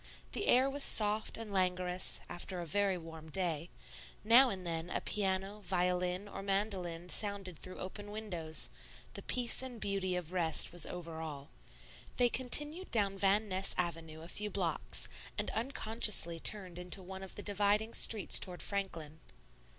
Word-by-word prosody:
The -, -, -2 dB
air 255 Hz, +2 st, +5 dB
was 280 Hz, +1 st, -1 dB
soft 215 Hz, -3 st, +4 dB
and 225 Hz, -3 st, -7 dB
languorous 180 Hz, -1 st, 0 dB
after 180 Hz, +1 st, -6 dB
a 175 Hz, -, -4 dB
very 195 Hz, +3 st, +1 dB
warm 160 Hz, -1 st, -10 dB
day; 170 Hz, -1 st, -1 dB, 0.5 s
now 240 Hz, +5 st, +7 dB
and 185 Hz, -4 st, -5 dB
then 165 Hz, 0 st, -3 dB
a -, -, -1 dB
piano, 195 Hz, 0 st, 0 dB
violin, 180 Hz, +1 st, 0 dB
or 200 Hz, -, -7 dB
mandolin 195 Hz, -4 st, -1 dB
sounded 200 Hz, -2 st, 0 dB
through 185 Hz, +4 st, -7 dB
open 205 Hz, +2 st, -6 dB
windows; 180 Hz, -7 st, -3 dB, 0.4 s
the -, -, -4 dB
peace 245 Hz, 0 st, +3 dB
and 255 Hz, -3 st, -7 dB
beauty 195 Hz, -3 st, -1 dB
of 175 Hz, -2 st, -4 dB
rest 165 Hz, -4 st, +2 dB
was 175 Hz, -, -2 dB
over 165 Hz, -2 st, -6 dB
all. 145 Hz, -2 st, -7 dB, 0.7 s
They 245 Hz, -1 st, +4 dB
continued 295 Hz, +9 st, +1 dB
down 200 Hz, -4 st, +3 dB
Van 200 Hz, +2 st, +2 dB
Ness 190 Hz, 0 st, +1 dB
Avenue 165 Hz, -3 st, -3 dB
a -, -, -9 dB
few 210 Hz, +4 st, -2 dB
blocks, -, -, 0 dB, 0.3 s
and -, -, 0 dB
unconsciously 220 Hz, -7 st, 0 dB
turned 185 Hz, -2 st, +1 dB
into 180 Hz, +1 st, -4 dB
one 190 Hz, +1 st, -8 dB
of 190 Hz, -, -8 dB
the 205 Hz, -, -6 dB
dividing 205 Hz, +2 st, +1 dB
streets 220 Hz, -3 st, +5 dB
toward 180 Hz, -1 st, -1 dB
Franklin. 165 Hz, -6 st, -4 dB
190 Hz, 160 wpm, -34 LUFS, 175-210 Hz, 0.7 s, now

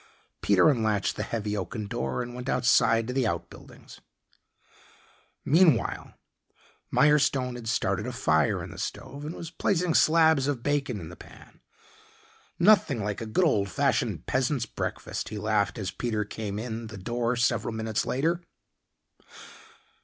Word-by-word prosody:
Peter 100 Hz, -3 st, +4 dB
unlatched 110 Hz, -8 st, +1 dB
the -, -, -4 dB
heavy 105 Hz, -2 st, -3 dB
oaken 105 Hz, +2 st, -4 dB
door 65 Hz, -, -3 dB
and 120 Hz, 0 st, -8 dB
went 125 Hz, +2 st, -6 dB
outside 115 Hz, -2 st, +3 dB
to 125 Hz, -, -4 dB
the 130 Hz, -3 st, +1 dB
outbuildings. -, -, -7 dB, 1.4 s
Meanwhile, 155 Hz, -5 st, +2 dB, 0.8 s
Mirestone 140 Hz, -4 st, +3 dB
had 120 Hz, -2 st, -8 dB
started 100 Hz, +1 st, 0 dB
a -, -, -3 dB
fire 80 Hz, -, +1 dB
in -, -, -8 dB
the -, -, -10 dB
stove 145 Hz, +1 st, -6 dB
and 155 Hz, -, -5 dB
was 165 Hz, -1 st, -8 dB
placing 180 Hz, -2 st, 0 dB
slabs 160 Hz, -4 st, +4 dB
of 135 Hz, -5 st, -2 dB
bacon 140 Hz, -6 st, -1 dB
in 80 Hz, -3 st, -8 dB
the 90 Hz, -, -10 dB
pan. -, -, -16 dB, 1.0 s
"Nothing 170 Hz, -, +4 dB
like 105 Hz, +1 st, -3 dB
a 115 Hz, -, -5 dB
good 175 Hz, +12 st, +2 dB
old 100 Hz, -10 st, +1 dB
fashioned 125 Hz, -, 0 dB
peasant's 130 Hz, -1 st, 0 dB
breakfast," -, -, -5 dB
he 110 Hz, -, -6 dB
laughed 105 Hz, -1 st, 0 dB
as 100 Hz, -4 st, -3 dB
Peter 110 Hz, -3 st, -2 dB
came 105 Hz, -1 st, -5 dB
in 115 Hz, 0 st, -5 dB
the 110 Hz, -1 st, -9 dB
door 120 Hz, +5 st, -1 dB
several 120 Hz, -1 st, 0 dB
minutes 110 Hz, -1 st, -2 dB
later. 165 Hz, +6 st, 0 dB
120 Hz, 145 wpm, -27 LUFS, 105-140 Hz, 1.4 s, Peter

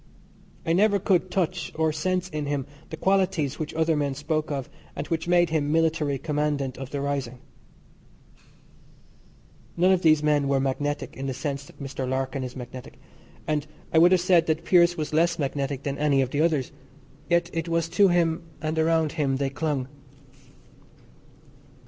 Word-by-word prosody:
I 165 Hz, -, +2 dB
never 205 Hz, +3 st, +4 dB
could 185 Hz, -1 st, +1 dB
"touch" 180 Hz, -3 st, -1 dB
or 160 Hz, -1 st, +1 dB
sense 180 Hz, +3 st, -1 dB
in 150 Hz, -4 st, -4 dB
him 140 Hz, -2 st, -1 dB, 0.2 s
the 160 Hz, -, -6 dB
qualities 190 Hz, -7 st, +1 dB
which 155 Hz, -1 st, -3 dB
other 160 Hz, 0 st, +2 dB
men 140 Hz, -2 st, -1 dB
spoke 155 Hz, +2 st, -2 dB
of, 140 Hz, -4 st, -3 dB, 0.3 s
and -, -, -4 dB
which 165 Hz, 0 st, -2 dB
made 175 Hz, -1 st, +3 dB
him 150 Hz, -2 st, 0 dB
military 160 Hz, -3 st, +1 dB
commandant 145 Hz, -3 st, -1 dB
of 135 Hz, -1 st, -6 dB
the 140 Hz, -, -4 dB
rising. 140 Hz, -3 st, -3 dB, 2.4 s
None 180 Hz, +2 st, +4 dB
of 185 Hz, -2 st, +3 dB
these 155 Hz, -3 st, +4 dB
men 150 Hz, -2 st, +2 dB
were 135 Hz, -1 st, +2 dB
magnetic 145 Hz, +2 st, -2 dB
in 135 Hz, +1 st, -5 dB
the 130 Hz, -, -3 dB
sense 140 Hz, 0 st, -4 dB
that -, -, -17 dB
Mr. 135 Hz, -2 st, -4 dB
Larkin 130 Hz, 0 st, -2 dB
is 125 Hz, -1 st, -6 dB
magnetic, 125 Hz, 0 st, -9 dB, 0.5 s
and 150 Hz, -1 st, -1 dB, 0.3 s
I 160 Hz, -, +6 dB
would 175 Hz, +2 st, +6 dB
have 185 Hz, -2 st, +4 dB
said 175 Hz, -2 st, +4 dB
that 160 Hz, +1 st, -1 dB
Pearse 175 Hz, -1 st, +4 dB
was 155 Hz, -1 st, -3 dB
less 170 Hz, +2 st, +2 dB
magnetic 140 Hz, -1 st, -2 dB
than 140 Hz, -1 st, -3 dB
any 145 Hz, -2 st, +3 dB
of 130 Hz, -, -5 dB
the 145 Hz, -, 0 dB
others. 155 Hz, -6 st, +1 dB, 0.6 s
Yet 170 Hz, 0 st, +2 dB
it 165 Hz, 0 st, -2 dB
was 165 Hz, -1 st, +1 dB
to 195 Hz, +4 st, +4 dB
him 170 Hz, -2 st, +2 dB, 0.2 s
and 155 Hz, +1 st, -2 dB
around 160 Hz, -1 st, +2 dB
him 140 Hz, -4 st, 0 dB
they 135 Hz, -1 st, -1 dB
clung. 140 Hz, -3 st, -2 dB
155 Hz, 175 wpm, -25 LUFS, 140-170 Hz, 2.4 s, I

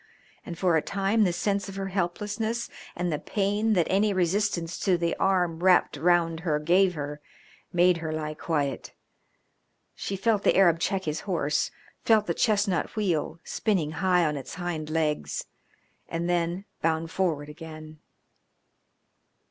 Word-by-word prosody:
And 170 Hz, -, -7 dB
for 180 Hz, -2 st, +2 dB
a 160 Hz, -, +3 dB
time 200 Hz, +4 st, +1 dB
the 180 Hz, -, +2 dB
sense 200 Hz, +3 st, -1 dB
of 195 Hz, -, -8 dB
her 195 Hz, 0 st, -3 dB
helplessness 210 Hz, +5 st, -2 dB, 0.2 s
and 175 Hz, -2 st, -1 dB
the 150 Hz, -, -1 dB
pain 205 Hz, +2 st, 0 dB
that 175 Hz, -5 st, +3 dB
any 200 Hz, +2 st, +2 dB
resistance 180 Hz, -2 st, 0 dB
to 185 Hz, -3 st, +2 dB
the 170 Hz, -1 st, 0 dB
arm 180 Hz, -4 st, +1 dB
wrapped 180 Hz, -4 st, +4 dB
round 165 Hz, +1 st, +2 dB
her 160 Hz, -3 st, 0 dB
gave 180 Hz, +4 st, +3 dB
her 145 Hz, 0 st, -5 dB, 0.5 s
made 175 Hz, 0 st, +4 dB
her 160 Hz, -1 st, -4 dB
lie 155 Hz, -1 st, -3 dB
quiet. 145 Hz, -4 st, -2 dB, 1.0 s
She 195 Hz, -, -4 dB
felt 210 Hz, +1 st, +1 dB
the -, -, +3 dB
Arab 170 Hz, -4 st, +5 dB
check 190 Hz, +2 st, 0 dB
his 155 Hz, -1 st, -2 dB
horse, 150 Hz, -4 st, +1 dB, 0.3 s
felt 220 Hz, -2 st, +4 dB
the 170 Hz, -, 0 dB
chestnut 200 Hz, -5 st, +1 dB
wheel, 170 Hz, -6 st, -1 dB
spinning 180 Hz, -9 st, 0 dB
high 180 Hz, +1 st, +2 dB
on 150 Hz, -1 st, 0 dB
his 135 Hz, +2 st, -7 dB
hind 165 Hz, -3 st, -4 dB
legs, 150 Hz, -, -1 dB, 0.6 s
and 165 Hz, +1 st, -2 dB
then 175 Hz, +2 st, 0 dB, 0.2 s
bound 160 Hz, 0 st, 0 dB
forward 160 Hz, -6 st, -1 dB
again. 155 Hz, 0 st, -10 dB
175 Hz, 150 wpm, -27 LUFS, 160-195 Hz, 1.0 s, Arab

